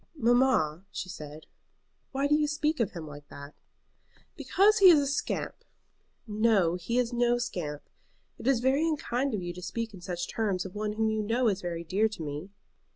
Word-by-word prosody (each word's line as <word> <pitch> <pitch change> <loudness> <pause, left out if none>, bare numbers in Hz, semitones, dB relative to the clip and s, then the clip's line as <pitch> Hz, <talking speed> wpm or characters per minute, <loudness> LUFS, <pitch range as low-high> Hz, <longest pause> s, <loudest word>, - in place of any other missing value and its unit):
"Mamma," 240 - +2
she 185 - -6
said 150 -3 -9 0.7
"why 275 +1 0
do 290 - +2
you 300 0 +3
speak 300 +1 0
of 230 - 0
him 170 -3 -6
like 145 -1 -11
that?" 140 +1 -11 0.8
"Because 420 +3 +3
he 385 -2 +9
is 325 -4 +7
a 285 - 0
scamp." 280 0 -3 0.6
"No, 210 -5 +2
he 180 +7 -2
is 245 -1 +1
no 240 0 +2
scamp. 175 -11 -4 0.6
It - - -5
is 265 -4 +3
very 265 +3 +2
unkind 275 -5 -1
of 190 - -4
you 175 0 -4
to 180 - -9
speak 220 +5 -4
in 190 - -11
such 175 -1 -4
terms 200 -5 -1
of 185 - -7
one 210 0 -2
whom 220 0 +1
you 220 0 0
know 230 +4 +1
is 195 -1 -2
very 170 -1 -4
dear 200 +6 +1
to 210 -6 -7
me." 150 +5 -5
215 Hz, 195 wpm, -29 LUFS, 175-255 Hz, 0.8 s, he